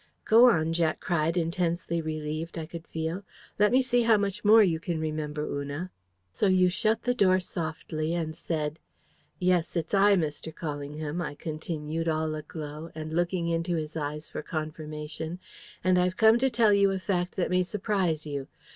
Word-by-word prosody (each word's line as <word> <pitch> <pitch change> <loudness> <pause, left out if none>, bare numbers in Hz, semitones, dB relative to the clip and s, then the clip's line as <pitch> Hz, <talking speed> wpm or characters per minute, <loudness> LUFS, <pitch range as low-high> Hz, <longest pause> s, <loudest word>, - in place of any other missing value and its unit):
'" - - -45
"Go 235 +3 +7
on!" 160 -6 +2
Jack 165 -2 +1
cried, 165 0 0
intensely 170 0 0
relieved, 155 +1 -4
I 160 - -3
could 165 +1 -9
feel. 160 +3 -3 0.4
"Let 210 0 +5
me 260 +1 +4
see 245 -1 +2
how 230 -2 +5
much 200 0 -2
more 220 +1 +8
you 165 -5 +1
can 165 0 -3
remember, 155 -1 -3
Una." 145 +6 -4 0.4
"So 200 - +1
you 185 -1 +4
shut 215 +4 0
the 245 - +2
door 190 -5 +4
softly 160 -2 -3
and 160 -2 -2
said: 155 -1 -3 0.6
"'Yes, 180 -2 +1
it's 165 +1 -2
I, 200 +1 +6
Mr. 160 -2 -2
Callingham,'" 150 +1 -4
I 145 - -5
continued 155 +1 -4
all 155 -1 0
aglow, 155 +1 -7
and 155 0 -5
looking 175 0 0
into 170 +1 0
his 155 -1 -4
eyes 150 0 -4
for - - -5
confirmation. 155 +1 -5 0.5
"'And 185 -1 +4
I've 180 +1 +1
come 220 +1 +6
to 265 +2 +3
tell 230 -3 +4
you 200 0 +5
a 195 - 0
fact 180 -1 -1
that 180 - -1
may 180 0 +3
surprise 185 -4 -1
you. 140 -2 -4
165 Hz, 180 wpm, -28 LUFS, 155-185 Hz, 0.6 s, more